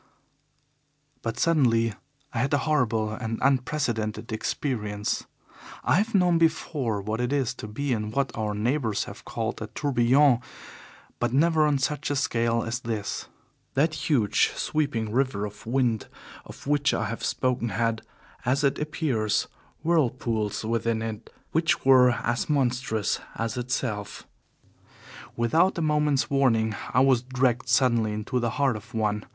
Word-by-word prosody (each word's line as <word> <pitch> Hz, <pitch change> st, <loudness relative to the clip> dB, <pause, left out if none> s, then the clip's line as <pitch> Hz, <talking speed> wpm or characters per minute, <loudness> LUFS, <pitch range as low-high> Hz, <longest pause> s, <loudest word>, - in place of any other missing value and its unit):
But 115 Hz, -1 st, -3 dB
suddenly 120 Hz, -9 st, +3 dB, 0.4 s
I 115 Hz, -, -1 dB
had 135 Hz, +4 st, +2 dB
a 145 Hz, -, -1 dB
horrible 115 Hz, -8 st, +1 dB
and 110 Hz, 0 st, -3 dB
unprecedented 125 Hz, -5 st, 0 dB
experience. 105 Hz, -2 st, -2 dB, 0.6 s
I 130 Hz, +6 st, +3 dB
have 215 Hz, +3 st, 0 dB
known 180 Hz, -3 st, +4 dB
before 150 Hz, -9 st, 0 dB
what 110 Hz, +3 st, -2 dB
it 125 Hz, +1 st, -1 dB
is 135 Hz, -4 st, +1 dB
to 105 Hz, -, -8 dB
be 130 Hz, +6 st, -2 dB
in 105 Hz, -2 st, -2 dB
what 135 Hz, +4 st, -1 dB
our 105 Hz, -2 st, -2 dB
neighbours 115 Hz, 0 st, 0 dB
have -, -, -10 dB
called -, -, -3 dB
a -, -, -4 dB
tourbillon, 130 Hz, 0 st, +3 dB, 0.8 s
but 120 Hz, 0 st, 0 dB
never 155 Hz, +2 st, +4 dB
on 145 Hz, -2 st, +2 dB
such 140 Hz, +3 st, -1 dB
a 145 Hz, -, 0 dB
scale 115 Hz, -4 st, +1 dB
as 115 Hz, +2 st, -3 dB
this. 115 Hz, -4 st, -4 dB, 0.5 s
That 155 Hz, +4 st, +3 dB, 0.2 s
huge, 115 Hz, -9 st, +3 dB
sweeping 130 Hz, -8 st, -1 dB
river 125 Hz, -4 st, 0 dB
of 105 Hz, +1 st, -10 dB
wind 120 Hz, -3 st, +1 dB, 0.4 s
of -, -, -12 dB
which 145 Hz, +1 st, +2 dB
I 110 Hz, -, -1 dB
have 115 Hz, +3 st, -5 dB
spoken 125 Hz, -2 st, 0 dB
had, 115 Hz, 0 st, 0 dB, 0.4 s
as 135 Hz, +4 st, +1 dB
it 140 Hz, -, +2 dB
appears, 140 Hz, -8 st, 0 dB, 0.4 s
whirlpools 120 Hz, -10 st, 0 dB
within 115 Hz, 0 st, 0 dB
it 110 Hz, 0 st, -6 dB, 0.2 s
which 160 Hz, -3 st, +1 dB
were 130 Hz, -2 st, +7 dB
as 120 Hz, +1 st, -1 dB
monstrous 125 Hz, -6 st, 0 dB, 0.2 s
as 115 Hz, -1 st, -2 dB
itself. 120 Hz, -4 st, -3 dB, 1.1 s
Without 160 Hz, +12 st, +2 dB
a -, -, -1 dB
moment's 150 Hz, -2 st, +2 dB
warning 115 Hz, -6 st, +2 dB, 0.2 s
I 125 Hz, -, +4 dB
was 130 Hz, -3 st, +4 dB
dragged 125 Hz, -1 st, 0 dB
suddenly 115 Hz, -5 st, +3 dB
into 105 Hz, +4 st, -2 dB
the 120 Hz, -1 st, 0 dB
heart 140 Hz, -4 st, +2 dB
of 115 Hz, +3 st, -10 dB
one. 105 Hz, -1 st, 0 dB
125 Hz, 145 wpm, -26 LUFS, 110-140 Hz, 1.1 s, were